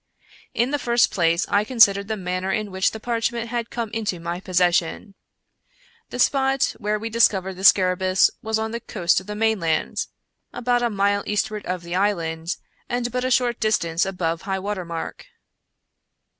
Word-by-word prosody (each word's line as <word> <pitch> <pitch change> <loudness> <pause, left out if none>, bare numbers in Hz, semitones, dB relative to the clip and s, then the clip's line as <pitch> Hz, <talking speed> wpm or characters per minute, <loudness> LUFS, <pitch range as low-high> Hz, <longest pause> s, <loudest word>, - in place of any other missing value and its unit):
In 240 +3 +1
the 290 - 0
first 240 -1 +2
place 170 -1 +2
I 205 0 +2
considered 205 -4 +4
the 220 0 -2
manner 185 0 -2
in 210 0 -2
which 190 0 +2
the 220 - -8
parchment 235 0 -2
had 235 -1 -3
come 230 -3 -4
into 210 -6 -2
my 170 +1 -4
possession. 180 +1 0 1.0
The - - -6
spot 270 +1 +2
where 210 -1 0
we 220 +2 -5
discovered 195 -4 +2
the 185 +1 -10
scarabccus 185 -1 +4
was 220 0 -1
on 220 0 -2
the 235 - -3
coast 180 -8 +1
of 190 - -17
the 210 - -5
mainland, 210 -7 0 0.4
about 245 0 0
a 240 - +1
mile 200 -1 +1
eastward 210 0 -2
of 180 -1 -3
the 170 0 -6
island, 170 -4 -1 0.3
and 245 0 -1
but 250 +1 -2
a 255 - 0
short 245 -2 +1
distance 170 -6 +1
above 170 -3 -2
high 195 -1 -2
water 190 -1 -4
mark. 165 -1 -6
205 Hz, 170 wpm, -23 LUFS, 185-230 Hz, 1.0 s, considered